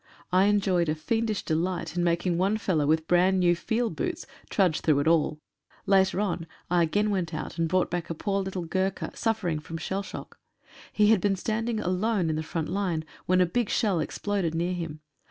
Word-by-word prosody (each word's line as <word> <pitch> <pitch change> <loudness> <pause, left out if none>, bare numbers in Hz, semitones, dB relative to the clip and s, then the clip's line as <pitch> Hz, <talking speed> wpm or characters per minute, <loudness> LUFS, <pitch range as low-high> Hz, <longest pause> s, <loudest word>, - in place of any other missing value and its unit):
I 185 +2 +5
enjoyed 195 -5 +2
a 155 - +1
fiendish 225 +5 -1
delight 175 +3 -1
in 175 - +1
making 170 0 +1
one 195 +4 +2
fellow 160 -9 0
with 160 +1 +2
brand 185 +2 +4
new 175 -1 +4
field 225 +6 -1
boots 360 0 -3 0.2
trudge 185 -6 +2
through 145 -3 +3
it 150 - -1
all. 160 -2 +2 0.5
Later 190 -1 +3
on 180 -5 -1 0.2
I 175 -1 +4
again 205 +6 +1
went 175 -5 -1
out 155 - -6
and 165 -1 +1
brought 185 +1 +1
back 175 -1 -3
a 165 - -3
poor 195 +4 -1
little 190 -2 -4
Gurkha 190 +3 -1
suffering 210 -9 -1
from 165 +2 -7
shell 190 +5 -3
shock. 195 - -9 0.5
He 210 0 +4
had 215 -5 +4
been 200 -1 +2
standing 220 +3 -2
alone 185 -2 0
in - - -1
the 155 - -1
front 160 0 -3
line 180 -5 -1 0.2
when 185 0 +4
a - - +5
big 230 +5 -1
shell 205 -7 +1
exploded 190 -2 -2
near 175 +2 0
him. 165 -3 -5
185 Hz, 200 wpm, -27 LUFS, 165-205 Hz, 0.5 s, I